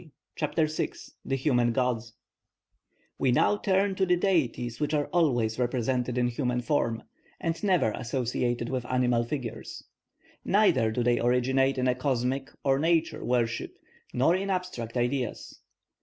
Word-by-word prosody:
CHAPTER 155 +1 0
VI 155 0 -2 0.3
THE 135 - -1
HUMAN 125 -4 +2
GODS 120 -2 -1 1.1
We 130 - +2
now 165 - +3
turn 195 0 +1
to 190 0 +1
the 180 - +4
deities 130 - 0
which 150 0 0
are 145 -1 +1
always 120 -10 +2
represented 125 0 0
in 125 0 +2
human 125 0 -1
form, 120 -4 0 0.4
and 165 +2 -3
never 185 - +3
associated 120 0 -2
with 130 -1 -2
animal 125 -2 +2
figures; 120 -3 -6 0.6
neither 185 - +3
do 120 +2 -1
they 120 0 +2
originate 130 +2 +2
in 130 0 +1
a 125 - +3
cosmic 130 +1 -1
or 135 -1 +2
nature 165 +1 +1
worship, 120 -2 -1 0.3
nor 140 +8 +3
in 195 +1 -2
abstract 180 -12 -3
ideas. 125 +1 -2
130 Hz, 140 wpm, -28 LUFS, 120-155 Hz, 1.1 s, the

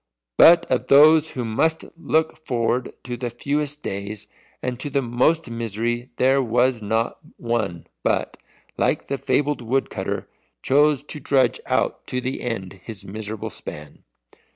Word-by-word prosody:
But 170 - +8
of 130 - -1
those 155 +3 +7
who 125 -2 -4
must 160 +9 +1
look 160 0 0
forward 120 -1 0
to 125 -1 -4
the 120 0 -3
fewest 145 +4 -2
days 100 +2 -4 0.4
and 125 -1 -3
to 145 - -3
the 140 0 0
most 125 +7 +2
misery 115 +2 -2
there 135 +2 +3
was 120 0 +1
not 110 +3 -1 0.2
one 110 -8 -2 0.2
but, - - 0 0.4
like - - 0
the 140 -1 -2
fabled 145 +1 0
woodcutter, 130 +3 -2 0.4
chose 145 +1 +3
to 150 +1 -7
trudge 130 -5 +2
out - - 0
to 125 - -1
the 130 +1 -3
end 100 -5 -4
his 110 -4 -8
miserable 105 +1 -5
span. 75 -1 -9
125 Hz, 145 wpm, -23 LUFS, 115-145 Hz, 0.4 s, But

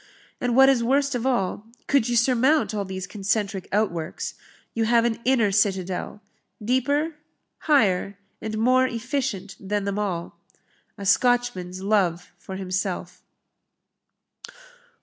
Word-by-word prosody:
And 245 -1 0
what 265 +1 +7
is 265 -3 +3
worst 275 +3 +2
of 245 +1 -1
all, 215 -3 -1 0.2
could 270 -4 +2
you 240 - 0
surmount 255 +4 +3
all 205 -2 -2
these 190 -1 -5
concentric 200 -1 -2
outworks, 175 -6 -2 0.4
you 225 -1 0
have 230 +1 +3
an 230 -1 0
inner 240 -6 +3
citadel, 190 0 -1 0.4
deeper, 285 +7 0 0.5
higher, 200 -8 +3 0.2
and 215 0 -4
more 255 +3 +4
efficient 230 -5 -3
than 205 +1 -2
them 200 +1 -2
all 180 -5 -3 0.6
a 200 - -7
Scotchman's 205 -5 +1
love 185 -4 +1
for 190 - -8
himself." 185 -1 -3
215 Hz, 125 wpm, -24 LUFS, 190-250 Hz, 0.6 s, what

